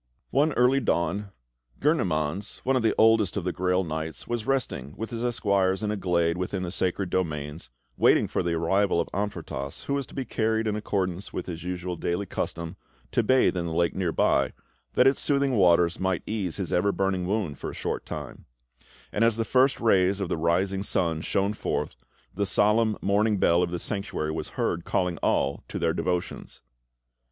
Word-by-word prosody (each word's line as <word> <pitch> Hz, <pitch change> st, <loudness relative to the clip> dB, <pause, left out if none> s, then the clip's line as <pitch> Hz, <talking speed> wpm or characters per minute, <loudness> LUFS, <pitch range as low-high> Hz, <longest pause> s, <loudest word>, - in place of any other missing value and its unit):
One 145 Hz, +4 st, +3 dB
early 125 Hz, +2 st, +4 dB
dawn, 100 Hz, -3 st, 0 dB, 0.5 s
Gurnemanz, 95 Hz, -, 0 dB
one 135 Hz, +1 st, +2 dB
of 130 Hz, -, +2 dB
the 115 Hz, -, +2 dB
oldest 110 Hz, -4 st, +4 dB
of 100 Hz, -, -1 dB
the 90 Hz, -, -1 dB
Grail 90 Hz, +1 st, +1 dB
Knights, 80 Hz, -1 st, -5 dB
was 120 Hz, -2 st, -3 dB
resting 125 Hz, -, -2 dB
with 110 Hz, +2 st, -5 dB
his 115 Hz, 0 st, -4 dB
Esquires 100 Hz, -5 st, +1 dB
in 105 Hz, -, 0 dB
a -, -, -1 dB
glade 85 Hz, -3 st, +1 dB
within 90 Hz, +1 st, -2 dB
the 85 Hz, -, -4 dB
sacred 95 Hz, 0 st, -1 dB
domains, 75 Hz, -5 st, -2 dB, 0.3 s
waiting -, -, +4 dB
for -, -, -1 dB
the 85 Hz, -2 st, 0 dB
arrival 95 Hz, +3 st, +2 dB
of 85 Hz, -, 0 dB
Amfortas, 95 Hz, -8 st, -4 dB
who 140 Hz, -, -2 dB
was 140 Hz, -2 st, -1 dB
to -, -, -14 dB
be 135 Hz, -, -2 dB
carried, 110 Hz, 0 st, 0 dB
in 105 Hz, -1 st, 0 dB
accordance 95 Hz, -3 st, -2 dB
with -, -, -4 dB
his 85 Hz, -2 st, -6 dB
usual 90 Hz, 0 st, -4 dB
daily 85 Hz, +4 st, -1 dB
custom, 85 Hz, -1 st, -4 dB, 0.3 s
to -, -, +3 dB
bathe 130 Hz, -2 st, +3 dB
in 85 Hz, -1 st, -2 dB
the 80 Hz, -, -3 dB
lake 85 Hz, 0 st, +2 dB
near 90 Hz, -3 st, -1 dB
by, -, -, +2 dB, 0.4 s
that 125 Hz, -, +4 dB
its 135 Hz, +1 st, +4 dB
soothing 140 Hz, -1 st, +2 dB
waters 90 Hz, -6 st, +4 dB
might 95 Hz, -2 st, 0 dB
ease 100 Hz, -6 st, -2 dB
his 95 Hz, -4 st, -3 dB
ever 100 Hz, +3 st, +3 dB
burning 95 Hz, -2 st, -1 dB
wound 95 Hz, -8 st, -1 dB
for -, -, -4 dB
a -, -, -8 dB
short -, -, -3 dB
time; -, -, -7 dB, 0.7 s
and 105 Hz, -, +1 dB
as 115 Hz, -1 st, +3 dB
the 115 Hz, -, 0 dB
first 130 Hz, +2 st, +3 dB
rays 100 Hz, -3 st, +3 dB
of 95 Hz, -3 st, -2 dB
the -, -, 0 dB
rising 90 Hz, +4 st, +1 dB
sun 85 Hz, -5 st, 0 dB
shone 100 Hz, +4 st, 0 dB
forth, -, -, -3 dB, 0.4 s
the 100 Hz, +1 st, -1 dB
solemn 105 Hz, +2 st, +3 dB
morning 105 Hz, +2 st, +2 dB
bell 85 Hz, -1 st, +3 dB
of 90 Hz, -, +1 dB
the 90 Hz, -, -3 dB
Sanctuary 100 Hz, -4 st, -3 dB
was -, -, -4 dB
heard 85 Hz, -, 0 dB
calling 90 Hz, -2 st, 0 dB
all 70 Hz, +1 st, 0 dB
to -, -, -5 dB
their 80 Hz, -1 st, +1 dB
devotions. 90 Hz, 0 st, -3 dB
95 Hz, 195 wpm, -26 LUFS, 85-110 Hz, 0.7 s, early